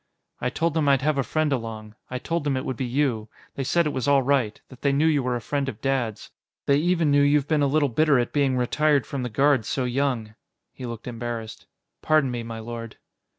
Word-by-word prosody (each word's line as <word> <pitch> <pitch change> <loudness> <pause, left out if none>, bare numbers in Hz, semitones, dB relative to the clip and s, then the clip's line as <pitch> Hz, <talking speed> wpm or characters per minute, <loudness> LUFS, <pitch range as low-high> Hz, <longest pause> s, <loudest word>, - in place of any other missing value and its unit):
"I 125 - -1
told 165 +5 -1
them 155 -3 +2
I'd 135 -1 +3
have 150 -1 +1
a - - +2
friend 155 +2 0
along. 110 -3 -5 0.2
I 125 - -3
told 165 +5 -2
them 140 -2 0
it 130 - -3
would 130 - -2
be 130 +1 -3
you. 120 -4 0 0.2
They 135 - -3
said 170 +5 +2
it 150 - -1
was 130 -1 -2
all 140 -1 +4
right, 125 -5 +1
that 130 - -14
they 140 - +2
knew 140 +3 +2
you 155 -3 +3
were 125 -1 -1
a 120 - -3
friend 140 +2 -2
of 110 - -8
Dad's. 125 -4 -2 0.3
They 140 - +4
even 165 -1 +2
knew 145 0 +5
you've 145 0 +3
been 155 -1 +2
a 140 - +3
little 145 +1 +2
bitter 145 +3 +3
at 120 -1 -1
being 140 -3 +2
retired 145 +3 +2
from 140 - -4
the 125 - -3
Guards 135 0 +2
so 130 - -1
young." 125 -3 -1 0.4
He 125 - -7
looked 115 -1 -7
embarrassed. 115 -2 -6 0.3
"Pardon 155 -4 +3
me, 120 -1 -3
my 115 0 -6
lord." 115 0 -7
135 Hz, 240 wpm, -25 LUFS, 120-145 Hz, 0.4 s, knew